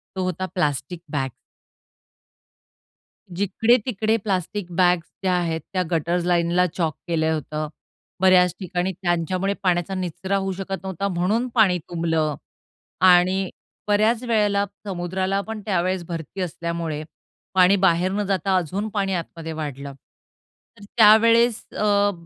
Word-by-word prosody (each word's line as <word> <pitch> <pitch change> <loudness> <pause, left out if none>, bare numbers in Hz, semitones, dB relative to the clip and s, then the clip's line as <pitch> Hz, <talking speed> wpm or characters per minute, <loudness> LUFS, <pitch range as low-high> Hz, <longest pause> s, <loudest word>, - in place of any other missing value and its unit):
तो 185 - -1
होता, 185 +1 -2
plastic 150 0 -1
bag. 135 -3 -1 2.0
जिकडे-तिकडे 220 +3 +1
plastic 195 0 -2
bags 175 -2 +3 0.2
ज्या 185 -1 +2
आहेत 165 -3 -1
त्या 185 -1 +1
गटर्स 170 +2 0
लाईनला 175 0 +2
चोक 160 -2 -2
केलं 160 -1 +1
होतं. 155 0 -3 0.5
बऱ्याच 185 -1 +5
ठिकाणी 180 0 -2
त्यांच्यामुळे 180 +2 0
पाण्याचा 180 0 +1
निचरा 185 +2 -2
होऊ 195 0 -2
शकत 195 0 -4
नव्हता 190 +1 -3
म्हणून 200 +7 0
पाणी 200 -6 +4
तुंबलं 160 -3 0 0.7
आणि 185 +1 +4 0.4
बऱ्याच 220 +4 +2
वेळेला 210 -4 +2 0.2
समुद्राला 185 +1 -2
पण 220 -1 -5
त्यावेळेस 185 -2 0
भरती 165 +2 -6
असल्यामुळे, 170 -3 -3 0.5
पाणी 185 +1 +5
बाहेर 180 0 +3
न 205 +1 -1
जाता 195 0 +1
अजून 190 +5 -2
पाणी 195 -2 0
आतमध्ये 165 -2 -5
वाढलं. 140 -3 -6 0.8
तर 205 - -14
त्यावेळेस 230 +1 +6
अ, 205 -1 +2
185 Hz, 120 wpm, -23 LUFS, 170-200 Hz, 2.0 s, त्यावेळेस